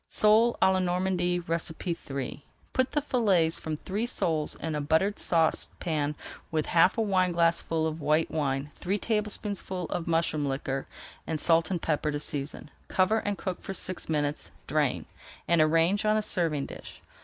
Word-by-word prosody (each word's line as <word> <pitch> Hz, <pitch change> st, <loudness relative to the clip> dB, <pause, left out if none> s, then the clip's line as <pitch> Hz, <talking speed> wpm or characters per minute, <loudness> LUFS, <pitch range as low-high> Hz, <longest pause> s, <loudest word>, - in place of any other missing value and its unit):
SOLE 220 Hz, +3 st, +5 dB
À 190 Hz, -, +5 dB
LA 190 Hz, -, +2 dB
NORMANDY 180 Hz, -1 st, 0 dB
III 160 Hz, -4 st, -3 dB, 0.3 s
Put 260 Hz, 0 st, +1 dB
the 295 Hz, -, +1 dB
fillets 195 Hz, -, +2 dB
from 155 Hz, -1 st, -4 dB
three 205 Hz, +8 st, -3 dB
soles 160 Hz, -10 st, -1 dB
in 160 Hz, -, -4 dB
a 150 Hz, -, -1 dB
buttered 160 Hz, +8 st, +1 dB
saucepan 160 Hz, -2 st, 0 dB, 0.3 s
with 155 Hz, -2 st, 0 dB
half 175 Hz, +5 st, +4 dB
a -, -, +2 dB
wineglassful 170 Hz, -4 st, +1 dB
of 160 Hz, 0 st, -3 dB
white 150 Hz, +2 st, +2 dB
wine, 140 Hz, -1 st, -1 dB
three 195 Hz, +3 st, -2 dB
tablespoonfuls 205 Hz, -4 st, -3 dB
of 175 Hz, -, -2 dB
mushroom 165 Hz, -3 st, +1 dB
liquor, 135 Hz, 0 st, -3 dB, 0.4 s
and 160 Hz, -1 st, -2 dB
salt 165 Hz, 0 st, +3 dB
and 180 Hz, -3 st, -2 dB
pepper 155 Hz, -1 st, 0 dB
to 145 Hz, 0 st, -2 dB
season. 145 Hz, 0 st, -5 dB, 0.2 s
Cover 195 Hz, +4 st, +2 dB
and 205 Hz, -2 st, -2 dB
cook 185 Hz, -2 st, -4 dB
for 195 Hz, -, -5 dB
six 185 Hz, -2 st, -4 dB
minutes, 150 Hz, -2 st, -1 dB, 0.2 s
drain, -, -, 0 dB, 0.4 s
and 170 Hz, -2 st, +4 dB
arrange 165 Hz, +6 st, +3 dB
on 215 Hz, 0 st, +3 dB
a 215 Hz, -, 0 dB
serving 165 Hz, -8 st, 0 dB
dish. -, -, -10 dB
170 Hz, 160 wpm, -28 LUFS, 155-190 Hz, 0.4 s, SOLE